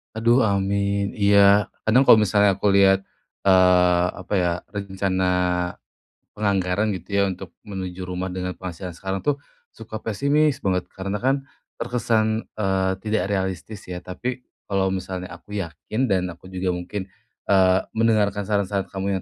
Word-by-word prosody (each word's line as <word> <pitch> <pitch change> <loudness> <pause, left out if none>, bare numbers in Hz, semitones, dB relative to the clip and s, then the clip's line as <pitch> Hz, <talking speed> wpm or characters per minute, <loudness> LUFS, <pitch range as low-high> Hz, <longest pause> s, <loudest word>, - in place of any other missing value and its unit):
Aduh, 115 +3 +3
amin. 100 0 0
Iya, 100 0 +5 0.2
kadang 125 +5 +4
kalau - - +10
misalnya 105 -2 +3
aku 100 +1 +1
lihat, 95 0 +5 0.4
eee, 90 -2 +5
apa 95 +1 -7
ya, 90 -1 +1 0.2
rencana 95 -2 -1 1.1
penganggaran, 100 0 0
gitu 95 -2 -5
ya, 100 - +4
untuk 95 -1 -8
menuju 95 -2 -6
rumah 90 0 -4
dengan 90 0 -3
penghasilan 90 0 -6
sekarang 95 0 -3
tuh, 145 -1 0 0.3
suka 110 -1 -9
pesimis 140 +6 +1
banget. 90 -2 -1
Karena 100 +3 -4
kan, 135 +1 +1 0.3
terkesan, 115 -2 0
eee, 95 -2 +1
tidak 105 -2 -1
realistis, 95 +1 -3
ya. 90 0 -6
Tapi, 125 +7 -5 0.2
kalau 95 -1 +1
misalnya 95 -1 -4
aku 105 - -12
yakin, 105 +6 -3
dan 95 -2 +2
aku 95 +3 -15
juga 95 -1 -1
mungkin, 95 +2 -5 0.4
eee, 95 -1 +4 0.2
mendengarkan 105 -3 +2
saran-saran 100 -1 -1
kamu 95 0 -2
100 Hz, 140 wpm, -23 LUFS, 95-105 Hz, 1.1 s, kalau